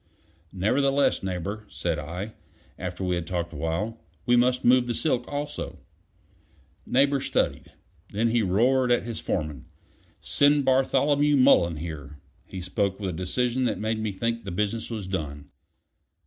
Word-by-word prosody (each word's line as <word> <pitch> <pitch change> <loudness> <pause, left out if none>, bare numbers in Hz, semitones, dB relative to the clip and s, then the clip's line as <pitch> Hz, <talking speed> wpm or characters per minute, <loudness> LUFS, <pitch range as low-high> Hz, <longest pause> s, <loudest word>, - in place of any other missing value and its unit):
"Nevertheless, 135 +9 +2
Neighbor," 95 +3 -4
said - - -2
I, 90 +8 -5 0.5
after 90 +1 -4
we 90 -1 0
had 85 -1 -2
talked 85 -2 -3
awhile, 85 +9 -2 0.3
"we 120 - +4
must 125 +1 +2
move 125 0 +5
the 120 - -1
silk 125 -4 0
also." 145 +1 -4 1.1
Neighbor 140 +1 +3
studied; - - -1 0.4
then 110 +3 +1
he 115 0 +2
roared 120 +6 +3
at 120 - +3
his 115 -1 -5
foreman. 75 -6 -3 0.5
"Send 145 0 +3
Bartholomew 140 +2 +3
Mullen 85 -10 +5
here." 75 -3 -7 0.3
He 95 -2 -7
spoke 95 +2 -1
with 95 -3 -2
a - - -7
decision 120 +9 0
that 110 -5 0
made 110 +2 -1
me 110 -1 -1
think 115 +4 -2
the 100 - -6
business 105 +5 -2
was 110 -4 -4
done. 75 -6 -5
110 Hz, 150 wpm, -26 LUFS, 90-125 Hz, 1.1 s, move